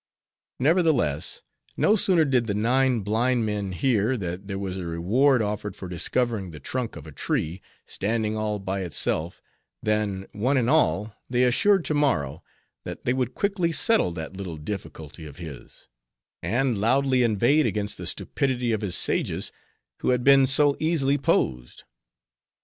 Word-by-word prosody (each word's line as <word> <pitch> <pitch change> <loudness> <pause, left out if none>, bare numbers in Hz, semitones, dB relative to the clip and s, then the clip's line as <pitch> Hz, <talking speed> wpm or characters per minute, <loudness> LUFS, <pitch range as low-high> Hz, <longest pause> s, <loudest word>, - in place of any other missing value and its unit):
Nevertheless, 140 - +1 0.3
no 215 - +4
sooner 180 -6 +3
did 125 -4 +1
the 100 - -1
nine 125 +2 +2
blind 115 +4 +1
men 105 -2 -2
hear 115 +4 +1
that 90 0 -5
there 100 -1 -4
was 95 -1 -4
a 90 - -5
reward 110 +10 +2
offered 105 -1 -3
for 95 - -8
discovering 100 +3 -1
the 75 -2 -10
trunk 125 - -4
of - - -9
a - - -10
tree, 85 +4 -2 0.2
standing 110 +1 -1
all 110 -1 -1
by 95 0 -3
itself, 85 -1 -2 0.4
than, 105 -3 0
one 130 +7 0
and 125 0 +2
all, 110 -9 +2 0.2
they 125 0 +2
assured 180 +9 +3
Tammaro, 95 - 0 0.4
that - - -8
they 125 - +2
would 130 -2 -2
quickly 195 -4 0
settle 225 - +3
that 80 +2 -7
little 95 -4 -6
difficulty 80 -2 -7
of 70 - -12
his; 80 -8 -11 0.5
and 120 +5 0
loudly 130 +3 +3
inveighed 120 +7 +3
against 105 -1 -2
the - - -4
stupidity 125 -3 -1
of 110 -1 -1
his 95 -4 -1
sages, - - -1 0.5
who - - -1
had 125 -1 +2
been 135 0 +6
so 140 +1 +3
easily 145 -3 +1
posed. 60 - 0
110 Hz, 155 wpm, -25 LUFS, 95-135 Hz, 0.5 s, been